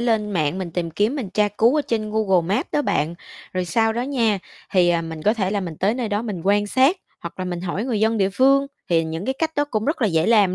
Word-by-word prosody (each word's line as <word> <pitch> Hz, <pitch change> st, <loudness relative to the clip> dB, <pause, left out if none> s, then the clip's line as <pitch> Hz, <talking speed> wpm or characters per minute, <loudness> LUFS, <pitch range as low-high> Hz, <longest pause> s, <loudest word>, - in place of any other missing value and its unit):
lên 220 Hz, -3 st, +1 dB
mạng 160 Hz, -1 st, 0 dB
mình 180 Hz, -3 st, -4 dB
tìm 170 Hz, 0 st, -3 dB
kiếm 210 Hz, -, 0 dB
mình 215 Hz, -9 st, -4 dB
tra 210 Hz, +1 st, +2 dB
cứu 235 Hz, +7 st, +4 dB
ở -, -, +1 dB
trên 215 Hz, -4 st, -2 dB
Google 190 Hz, -4 st, +1 dB
Maps -, -, -2 dB
đó 295 Hz, -, +2 dB
bạn, 160 Hz, -, 0 dB, 0.4 s
rồi 185 Hz, -1 st, -1 dB
sau 225 Hz, +6 st, +1 dB
đó 240 Hz, +2 st, -2 dB
nha, 235 Hz, -7 st, +1 dB, 0.3 s
thì, 180 Hz, -2 st, +4 dB
ờ, 170 Hz, -1 st, +1 dB
mình 160 Hz, -1 st, -7 dB
có 210 Hz, +6 st, +3 dB
thể 195 Hz, -4 st, -1 dB
là 205 Hz, -1 st, 0 dB
mình 170 Hz, -4 st, -6 dB
tới 205 Hz, +5 st, +1 dB
nơi 245 Hz, -4 st, -2 dB
đó 205 Hz, +1 st, -1 dB
mình 210 Hz, -7 st, -4 dB
quan 205 Hz, +1 st, +2 dB
sát, 265 Hz, -, +3 dB, 0.2 s
hoặc 170 Hz, +2 st, -8 dB
là 185 Hz, -, -2 dB
mình 175 Hz, -1 st, -4 dB
hỏi 185 Hz, +5 st, -3 dB
người 235 Hz, -5 st, -1 dB
dân 220 Hz, +1 st, +2 dB
địa 195 Hz, -1 st, +2 dB
phương, 275 Hz, +5 st, +4 dB, 0.2 s
thì 165 Hz, -2 st, +2 dB
những 160 Hz, +4 st, -4 dB
cái 265 Hz, -, -1 dB
cách 320 Hz, -1 st, -1 dB
đó 290 Hz, -, +2 dB
cũng 220 Hz, -7 st, -2 dB
rất 295 Hz, -3 st, -1 dB
là -, -, +4 dB
dễ 165 Hz, -1 st, +1 dB
làm 205 Hz, -5 st, +4 dB
205 Hz, 280 wpm, -22 LUFS, 180-235 Hz, 0.4 s, cứu